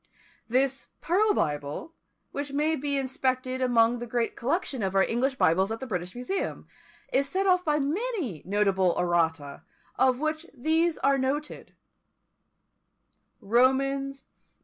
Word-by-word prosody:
This 265 +3 0
Pearl 410 +6 +2
Bible, 145 - -2 0.4
which 285 0 -4
may 305 +3 +1
be 285 0 -1
inspected 260 -1 -1
among 240 -1 +3
the 240 - -6
great 235 0 -1
collection 280 -1 -1
of 195 -1 -2
our 195 - +5
English 260 +5 0
Bibles 190 -3 +2
at 225 - -3
the 265 - -5
British 180 -5 -4
Museum, 250 +11 -3 0.5
is 275 +1 +2
set 385 +4 0
off 365 -1 +3
by 300 -3 +1
many 300 - -2
notable 195 -2 +1
errata, 165 -5 0 0.4
of 255 -1 +3
which 310 +2 -2
these 320 +5 +1
are 275 0 +2
noticed: 285 +3 -3 1.7
Romans 270 +4 +1
vi. - - -40
260 Hz, 135 wpm, -27 LUFS, 220-295 Hz, 1.7 s, our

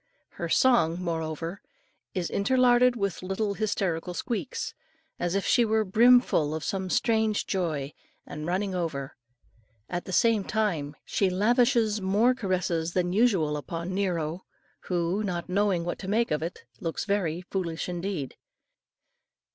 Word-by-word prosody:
Her - - -5
song, 180 -10 +3
moreover, 165 +1 -3 0.5
is 180 -2 -2
interlarded 250 +3 +4
with 200 -5 -2
little 195 +3 -1
hysterical 185 -5 -2
squeaks, 240 +4 -3 0.5
as 175 +1 -1
if 200 - 0
she 240 - +4
were 220 -1 +2
brim 240 +6 +6
full 155 - 0
of 160 - -4
some 190 +2 -2
strange 220 -1 +1
joy, 155 -7 -2 0.3
and 150 +1 -6
running 190 +2 -1
over. 155 -7 -3 0.7
At 175 0 -4
the - - -6
same 220 +2 +3
time 175 -10 -1
she 195 - +1
lavishes 225 +2 +2
more 205 +7 +3
caresses 180 -7 -1
than 180 -1 0
usual 190 -9 +3
upon 165 +5 -4
Nero, 175 -3 -1 0.4
who, 175 +2 0
not 180 -3 -3
knowing 190 -3 +1
what 175 - -3
to 190 - -7
make 225 +4 +1
of 150 - 0
it, 165 +2 -5 0.2
looks 165 - -3
very 185 -5 0
foolish 175 -3 -3
indeed. 175 -5 -4
185 Hz, 140 wpm, -27 LUFS, 170-215 Hz, 0.7 s, brim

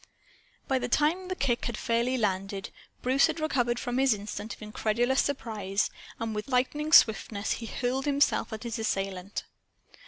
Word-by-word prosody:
By 265 -1 +2
the - - -2
time 310 +8 +1
the 370 - -2
kick 240 -8 0
had 235 -3 -3
fairly 235 +2 +1
landed, 195 -2 -2 0.3
Bruce 260 +2 +4
had - - -3
recovered 245 -6 +1
from 245 +1 -2
his 265 -4 +4
instant 210 +2 -6
of - - -23
incredulous 230 +4 +1
surprise; 215 -7 -1 0.3
and 225 -1 -2
with 210 0 -4
lightning 275 +4 0
swiftness 220 -5 +5
he 230 - -2
hurled 260 +3 -2
himself 285 -2 +2
at 220 +1 -6
his 230 -2 -4
assailant. 195 -3 -2
235 Hz, 160 wpm, -28 LUFS, 215-265 Hz, 0.3 s, swiftness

